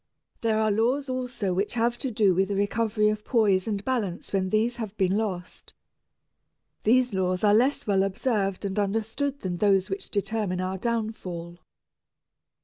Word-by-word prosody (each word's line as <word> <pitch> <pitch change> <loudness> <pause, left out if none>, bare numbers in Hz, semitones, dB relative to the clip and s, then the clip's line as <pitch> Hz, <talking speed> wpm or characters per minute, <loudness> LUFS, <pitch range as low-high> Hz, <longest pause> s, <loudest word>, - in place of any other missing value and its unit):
There 225 -1 +1
are 215 -1 +2
laws 250 +7 +1
also 250 -7 -2
which 195 +6 -1
have 235 +1 +1
to 265 - -2
do 210 -4 +3
with 190 +2 +2
the 200 - -2
recovery 210 +1 +1
of 210 0 -2
poise 210 -6 +2
and 205 -2 -2
balance 215 -11 -2
when 190 -1 +1
these 225 +4 +1
have 215 -3 -6
been 190 -1 +2
lost. 190 -5 -4 1.1
These 250 +1 +3
laws 185 0 0
are 205 -1 +5
less 255 +6 +2
well 195 -2 +2
observed 195 0 -1
and 195 +1 -1
understood 225 +7 -1
than 180 -2 -3
those 195 -1 +2
which 195 - -4
determine 200 -2 -1
our 185 +1 -2
downfall. 190 -7 -3
210 Hz, 160 wpm, -26 LUFS, 190-230 Hz, 1.1 s, are